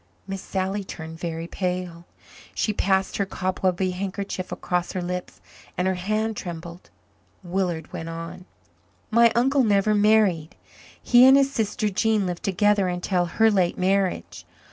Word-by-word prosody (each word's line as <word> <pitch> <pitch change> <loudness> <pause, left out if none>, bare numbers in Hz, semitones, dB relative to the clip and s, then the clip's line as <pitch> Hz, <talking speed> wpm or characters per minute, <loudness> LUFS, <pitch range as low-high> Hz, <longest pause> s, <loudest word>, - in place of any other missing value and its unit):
Miss 195 -1 -5
Sally 195 +1 -2
turned 160 -3 -8
very 165 -1 -4
pale. 180 -1 -4 0.5
She 215 - 0
passed 190 -1 0
her 200 - 0
cobwebby 185 0 -1
handkerchief 190 0 -4
across 180 -1 -2
her 185 - -2
lips 180 0 -5 0.4
and 180 - +1
her 190 - +2
hand 215 +4 -1
trembled. 170 -1 -8 0.5
Willard 175 -3 -2
went 165 - -5
on. 165 +2 -7 0.7
"My 235 +1 +5
uncle 265 +3 +3
never 210 -1 +3
married. 205 -6 +3 0.4
He 245 0 +5
and 265 +1 +8
his 275 0 +2
sister 215 -2 -1
Jean 210 +1 +1
lived 175 -1 -4
together 200 0 +2
until 180 0 0
her 220 +6 +3
late 185 -4 +1
marriage. 190 0 0
190 Hz, 145 wpm, -24 LUFS, 180-210 Hz, 0.7 s, and